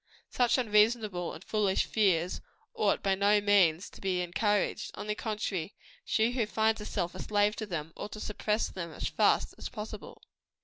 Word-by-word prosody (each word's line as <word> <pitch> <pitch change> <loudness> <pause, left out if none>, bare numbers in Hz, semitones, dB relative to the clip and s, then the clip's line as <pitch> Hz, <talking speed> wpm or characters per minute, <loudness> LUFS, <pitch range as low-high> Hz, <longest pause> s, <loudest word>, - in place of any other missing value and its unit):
Such 245 0 +3
unreasonable 210 -5 +2
and 165 - -10
foolish 205 -3 +1
fears 180 -5 +1 0.3
ought 450 - +1
by 195 - +2
no 200 +2 +4
means 190 -4 +3
to - - -14
be 185 -2 0
encouraged; 195 +4 0
on - - -6
the 210 - -1
contrary, 210 -5 -3 0.3
she 225 - +1
who 245 -4 0
finds 220 +1 +1
herself 175 -4 -3
a 185 - -9
slave 205 0 +2
to 215 - -4
them, 160 -4 -5
ought 205 - -7
to 215 - -7
suppress 210 +1 -1
them 170 -3 -6
as - - -3
fast - - +2
as - - -5
possible. 215 -1 -8
205 Hz, 175 wpm, -30 LUFS, 185-215 Hz, 0.3 s, no